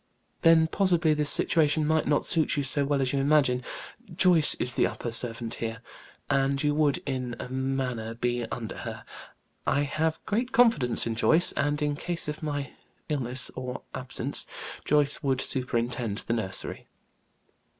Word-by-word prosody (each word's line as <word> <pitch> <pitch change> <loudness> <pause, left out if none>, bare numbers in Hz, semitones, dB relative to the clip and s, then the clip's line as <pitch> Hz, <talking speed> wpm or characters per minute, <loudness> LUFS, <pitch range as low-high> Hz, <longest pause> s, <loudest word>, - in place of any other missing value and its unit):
"Then 165 -1 +6
possibly 170 -2 +2
this 150 -1 +1
situation 155 -1 +3
might 160 +1 +1
not 145 0 +1
suit 160 -3 +2
you 145 - +1
so 140 +1 +2
well 140 -1 +1
as 130 - -1
you 140 - +1
imagine. 135 -3 +2 0.5
Joyce 170 -4 +4
is 125 - +1
the - - +2
upper 120 - -5
servant 115 0 -2
here, 115 0 -3 0.5
and 135 0 +1
you 145 0 +2
would, 150 -2 +2
in 130 -3 -3
a - - -5
manner, 130 -4 -2
be 120 0 -1
under 115 -2 -6
her. - - -7 0.6
I 140 +2 +2
have 155 +2 -1
great 240 +4 -1
confidence 230 - +4
in 115 - -1
Joyce; 160 +9 +4
and 145 +1 -1
in 145 -1 0
case 170 +2 -1
of 150 0 -5
my 145 -3 -3 0.4
illness 130 -4 -1
or 130 0 -6
absence, 130 -1 -3 0.4
Joyce 150 0 +3
would 135 -2 0
superintend 120 -5 -2
the 115 - -2
nursery." 100 -5 -3
140 Hz, 160 wpm, -27 LUFS, 125-155 Hz, 0.6 s, Then